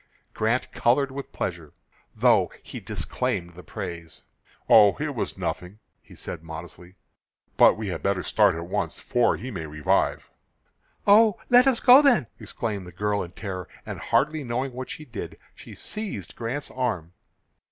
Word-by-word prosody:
Grant 115 +3 0
colored 135 +3 +2
with 140 +1 -7
pleasure, 85 -4 -5 0.4
though - - +3
he - - -8
disclaimed 90 0 -3
the 90 - -11
praise. 85 -2 -8 0.4
"Oh, 105 -3 +7
it - - -2
was - - -4
nothing!" 90 +3 -4 0.2
he - - -17
said, - - -7
modestly. 85 +2 -10 0.6
"But - - +6
we 110 -2 -4
had 90 - -4
better 100 -2 0
start 105 -5 +3
at 85 +1 -5
once, 90 -2 -3
for 120 -1 +1
he 130 - -7
may 85 -7 -5
revive." 75 0 0 0.7
"Oh, 210 0 +6
let 245 +2 +7
us 260 -3 +3
go 260 +2 +8
then," 245 - +4
exclaimed 105 -3 -4
the - - -10
girl 100 +3 -1
in 90 0 -7
terror, 95 -3 -6 0.2
and, - - -6
hardly 150 +1 +1
knowing 125 +2 -3
what 130 +1 -6
she 155 - -7
did, 120 -6 -7 0.2
she - - -12
seized 195 - -7
Grant's 125 +5 -4
arm. 100 -10 -3
105 Hz, 160 wpm, -25 LUFS, 90-130 Hz, 0.7 s, go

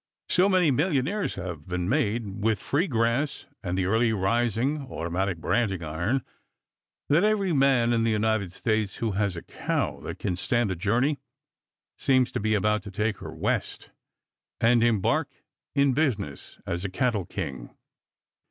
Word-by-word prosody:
So 185 +2 +4
many 180 -6 +4
millionaires 150 +7 0
have 90 -5 -6
been 90 -1 -2
made 110 -5 0
with 110 -2 +2
"free 165 +7 0
grass" 115 +3 0 0.2
and 90 -3 -2
the 95 - +1
early 110 +4 +2
rising, 120 +7 0
automatic 90 -1 -2
branding 95 0 0
iron 85 - -1 0.9
that 155 +6 +4
every 205 -4 +2
man 135 -4 +4
in 115 -1 +2
the 115 - +2
United 110 -3 +1
States 110 0 -1
who 115 -2 -1
has 100 -1 0
a 85 - -7
cow - - -2
that - - -6
can 90 - -2
stand 120 +3 +1
the - - -1
journey 120 - +1 0.8
seems 130 -2 +3
to - - -2
be 110 +1 +1
about 105 +1 +2
to 105 - -9
take 105 +2 -1
her - - -7
west - - -2 0.7
and 115 0 +4
embark 110 -5 +2 0.5
in 140 -1 +4
business 110 - -2
as 85 +1 -3
a 100 - -2
cattle 105 -2 0
king. 65 -9 -6
110 Hz, 155 wpm, -26 LUFS, 95-130 Hz, 0.9 s, So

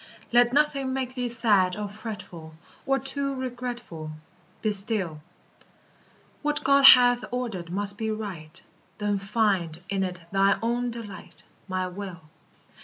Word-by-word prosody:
Let 240 0 +4
nothing 275 -2 +1
make 260 -1 -3
thee 250 -1 -3
sad 205 -6 +2
or 210 -1 -3
fretful, 195 -7 -9 0.3
Or 270 0 +3
too 275 +1 +4
regretful; 245 -10 -6 0.5
Be 215 - +2
still; 195 -6 +1 1.2
What 295 0 -1
God 275 0 +4
hath 245 -2 +8
ordered 225 -9 -4
must 200 +2 +1
be 220 -1 -2
right; 190 -7 -5 0.4
Then 205 -1 -1
find 195 -5 0
in 195 -1 -1
it 180 -1 -3
thine 195 0 +3
own 240 +1 0
delight, 200 -8 -8 0.2
My 185 -1 -2
will. 185 -1 -7
215 Hz, 130 wpm, -26 LUFS, 185-245 Hz, 1.2 s, hath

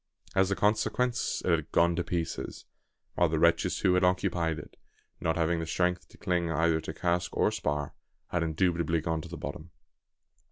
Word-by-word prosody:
As 95 0 +3
a 100 - +1
consequence 115 +4 +1
it 90 - +2
had 80 -1 0
gone 85 0 +3
to 90 - 0
pieces; 85 -1 -4 0.5
while 85 - +3
the 80 - 0
wretches 85 +2 +2
who 90 - +4
had 90 0 +3
occupied 90 -3 +1
it, 75 - -10 0.4
not 80 - 0
having 85 0 +1
the 80 - -4
strength 90 +1 0
to - - -18
cling 90 -2 0
either 80 0 +2
to 80 - -5
cask 85 +2 -1
or - - +3
spar, 75 -1 -2 0.4
had 85 - 0
indubitably 85 0 +1
gone 80 0 -1
to 85 - -10
the 85 - -7
bottom. 80 +1 -6
85 Hz, 185 wpm, -29 LUFS, 80-90 Hz, 0.5 s, who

